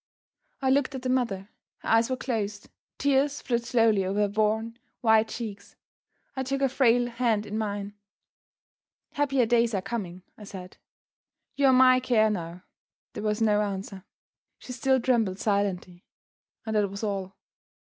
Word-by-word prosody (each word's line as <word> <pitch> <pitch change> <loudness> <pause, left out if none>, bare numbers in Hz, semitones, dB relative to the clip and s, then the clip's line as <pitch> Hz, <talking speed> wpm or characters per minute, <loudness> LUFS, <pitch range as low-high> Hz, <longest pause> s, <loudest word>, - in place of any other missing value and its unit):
I 260 - +3
looked 270 0 +1
at 255 - -6
the 255 - -2
mother. 210 -7 -1 0.3
Her - - -5
eyes 225 +1 +3
were 255 - -1
closed; 210 -5 -3
the - - -21 0.3
tears 280 +1 +1
flowed 240 -2 -1
slowly 225 -5 +3
over 195 +2 -1
her 205 - +3
worn, 220 +3 -1 0.2
white 220 -1 +4
cheeks. 205 -4 -7 0.6
I 265 - -2
took 270 +1 -2
her 270 - +3
frail 245 -2 +3
hand 235 -3 0
in 210 - -6
mine. 205 -2 -3 1.2
"Happier 275 -4 +1
days 235 -1 +2
are 190 - -1
coming," 185 -4 -5 0.2
I 210 - -10
said; 185 -2 -10 0.8
"you 280 0 +3
are - - +6
my 255 0 +6
care 225 -4 +2
now." 175 -2 -5 0.5
There - - -6
was 215 +1 0
no 210 -1 +3
answer. 195 -1 -5 0.5
She 250 - -9
still 265 +1 +2
trembled 230 -7 +1
silently, 195 -4 -2 0.6
and 220 -1 -3
that 205 -2 +2
was 200 +2 -7
all. 195 -2 -3
220 Hz, 160 wpm, -27 LUFS, 200-255 Hz, 1.2 s, are